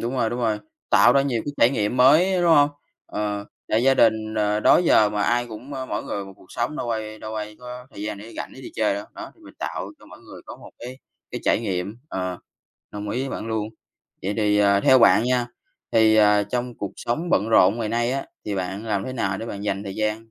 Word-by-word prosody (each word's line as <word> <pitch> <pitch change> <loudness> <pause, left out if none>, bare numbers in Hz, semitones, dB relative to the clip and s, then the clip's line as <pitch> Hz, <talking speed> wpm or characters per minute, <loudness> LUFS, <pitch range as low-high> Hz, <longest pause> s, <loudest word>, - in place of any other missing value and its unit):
đúng 120 +2 -3
rồi, 115 -3 0
đúng 120 - -3
rồi. 110 -3 0 0.3
Tạo 120 - +6
ra 140 - +4
nhiều 125 -5 -1
cái 145 - -4
trải 120 - +5
nghiệm 105 -2 -1
mới, 165 +9 +5
đúng 175 -1 +3
hông? 145 -2 +5 0.4
Ờ, 105 -1 -3 0.2
tại 110 +2 +2
gia 135 +1 +4
đình, 110 -2 +2
ờ, 105 0 +1
đó - - +6
giờ 135 -11 +4
mà 105 0 -1
ai 120 +2 +1
cũng, 120 +5 -10
ơ, 130 -1 -5
mỗi - - -4
người 100 - -4
một 95 - -11
cuộc - - -19
sống, 120 +5 -3
đâu 120 - -3
ai 110 -1 -4
đâu 110 0 -7
ai 105 0 -5
có 125 0 -9
thời 100 - -9
gian 105 -1 -4
để 110 +3 -11
rảnh - - -5
để 130 - -11
đi 130 - -9
chơi 110 -2 +1
đâu. 100 +1 -5
Đó, - - -8
thì - - -26
mình - - -14
tạo - - -4
cho - - -18
mỗi - - -14
người - - -13
có - - -9
một - - -14
cái 125 +2 -9 0.3
cái - - -5
trải - - +2
nghiệm. 100 -1 -3
Ờ, 90 - -4 0.5
đồng 105 0 -6
ý 125 - -2
với 135 - -3
bạn 110 - -5
luôn. 110 -1 -2 0.5
Vậy 100 +2 -2
thì, 105 -2 +2
ờ, 100 -1 +4
theo 130 0 +6
bạn 115 -1 +6
nha, 125 -1 +1 0.5
thì, 110 -1 +5
ờ, 105 -1 +5
trong 120 +4 -3
cuộc 100 - -4
sống 160 +9 -3
bận 105 +4 +2
rộn 105 0 +4
ngày 110 -2 -2
nay 120 +2 0
á, 135 0 -3 0.2
thì 105 - -3
bạn 95 +3 -4
làm 100 -3 -1
thế 130 - -5
nào 95 -6 -2
để 115 - -6
bạn 100 -3 -6
dành 100 -1 -2
thời 100 -2 -6
gian 110 +1 -2
110 Hz, 255 wpm, -23 LUFS, 105-125 Hz, 0.5 s, Tạo